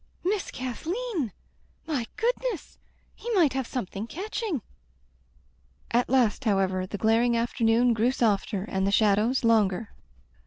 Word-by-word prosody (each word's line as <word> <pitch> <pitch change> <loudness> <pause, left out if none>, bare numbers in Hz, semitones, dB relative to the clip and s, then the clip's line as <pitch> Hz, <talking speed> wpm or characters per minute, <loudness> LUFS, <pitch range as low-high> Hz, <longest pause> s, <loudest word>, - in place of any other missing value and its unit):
"Miss 390 +2 0
Kathleen! 320 - -3 0.5
My 280 -8 -2
goodness! 475 - -2 0.3
He 475 - -8
might 325 -8 +4
have 265 -2 -2
something 215 -3 -4
catching." 385 - -3 1.3
At 240 +1 +2
last, 250 -2 +2
however, 190 -3 +1
the 205 - -5
glaring 230 +3 +3
afternoon 235 0 +2
grew 225 +2 +2
softer, 210 -5 0
and 190 -2 -1
the - - +1
shadows 215 +5 +3
longer. 220 -2 +2
235 Hz, 120 wpm, -27 LUFS, 210-295 Hz, 1.3 s, might